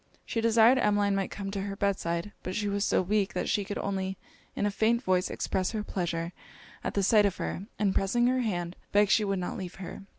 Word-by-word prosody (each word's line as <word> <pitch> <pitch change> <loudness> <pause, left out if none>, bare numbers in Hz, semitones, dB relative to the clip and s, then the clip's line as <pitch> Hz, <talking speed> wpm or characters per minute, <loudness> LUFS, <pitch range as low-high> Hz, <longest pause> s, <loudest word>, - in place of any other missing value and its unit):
She 230 - -2
desired 230 +3 +5
Emmeline 205 -2 +2
might 195 -1 -1
come 195 -1 -5
to 200 -1 -3
her 195 0 -4
bed 200 -1 0
side: 170 +4 -2
but 185 - -5
she 210 -1 -1
was 200 0 0
so 185 - +2
weak, 200 +1 0
that - - -1
she 205 - +1
could 205 +1 -5
only 190 -1 -2 0.4
in - - 0
a 205 - +1
faint 230 +4 +2
voice 185 -3 +1
express 190 +3 -1
her 215 -1 -2
pleasure 170 -3 -3 0.5
at - - -3
the 200 - +2
sight 210 +1 +5
of 190 - -4
her; 195 - -4
and 200 -3 +1
pressing 240 +5 +2
her 255 +1 +2
hand, 175 -6 -2 0.2
begged 205 -1 +4
she 215 - +4
would 195 -1 0
not 180 -1 -3
leave 180 -1 -6
her. 190 - -8
200 Hz, 235 wpm, -29 LUFS, 185-210 Hz, 0.5 s, desired